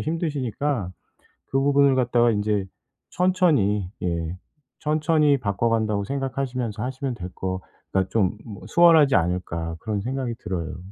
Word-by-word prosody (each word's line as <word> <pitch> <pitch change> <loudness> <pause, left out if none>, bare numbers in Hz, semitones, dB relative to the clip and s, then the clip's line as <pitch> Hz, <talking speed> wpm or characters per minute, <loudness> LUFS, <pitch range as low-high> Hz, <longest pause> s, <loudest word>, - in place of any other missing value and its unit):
힘드시니까 145 - -2 0.6
그 135 - 0
부분을 140 -1 +4
갖다가 120 -2 +3
인제 105 -1 0 0.4
천천히 155 - +2
예 85 -1 -2 0.4
천천히 150 -1 +2
바꿔간다고 110 -1 0
생각하시면서 130 -4 -3
하시면 130 0 -3
될 90 -5 -7
거 95 0 -3 0.3
그러니까 95 -1 +1
좀 105 -3 +1
뭐 105 -4 -10
수월하지 160 -5 +6
않을까 85 -1 -1
그런 105 -2 -2
생각이 125 +1 -3
들어요. 90 -5 -4
120 Hz, 320 characters per minute, -24 LUFS, 100-140 Hz, 0.6 s, 수월하지